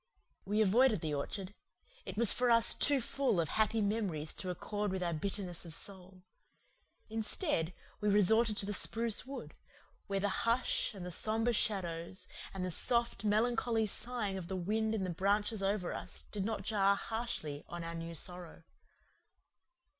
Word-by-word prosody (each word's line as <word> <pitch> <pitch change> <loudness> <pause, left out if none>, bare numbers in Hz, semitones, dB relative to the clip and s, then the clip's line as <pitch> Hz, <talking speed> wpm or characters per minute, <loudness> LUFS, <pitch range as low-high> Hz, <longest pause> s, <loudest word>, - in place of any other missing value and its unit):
We 210 +2 +1
avoided 220 0 +4
the 155 -2 -2
orchard; 185 +7 -4 0.5
it - - -6
was 230 -2 +7
for 245 0 +1
us 230 -1 +8
too 285 -1 +5
full 260 -5 0
of 160 -3 0
happy 220 +1 +1
memories 200 -8 -1
to 185 - -3
accord 205 +3 -3
with 190 -1 -2
our 170 -1 -1
bitterness 180 +1 -3
of 165 -2 -5
soul. 185 0 -4 0.8
Instead, 220 - 0 0.3
we 210 - +1
resorted 215 +2 +4
to - - +3
the 205 - -2
spruce 230 +4 0
wood, 275 - -7 0.5
where 195 -1 -1
the 205 - +1 0.2
hush 230 -1 +1
and 185 -2 -7
the 180 - -5
sombre 225 +6 0
shadows 185 -4 -1 0.2
and 190 -1 -4
the 180 - -2
soft, 235 +6 +1
melancholy 225 +1 +1
sighing 215 -2 -2
of 170 - -8
the 190 - -4
wind 215 +4 0
in 200 - -1
the 185 - -2
branches 205 +4 0
over 195 -2 -1
us - - -7
did 205 -2 -2
not 220 -2 -3
jar 200 -1 +3
harshly 200 -11 -3
on 175 0 -5
our 165 0 -5
new 165 0 -6
sorrow. 175 0 -4
205 Hz, 165 wpm, -34 LUFS, 180-225 Hz, 0.8 s, us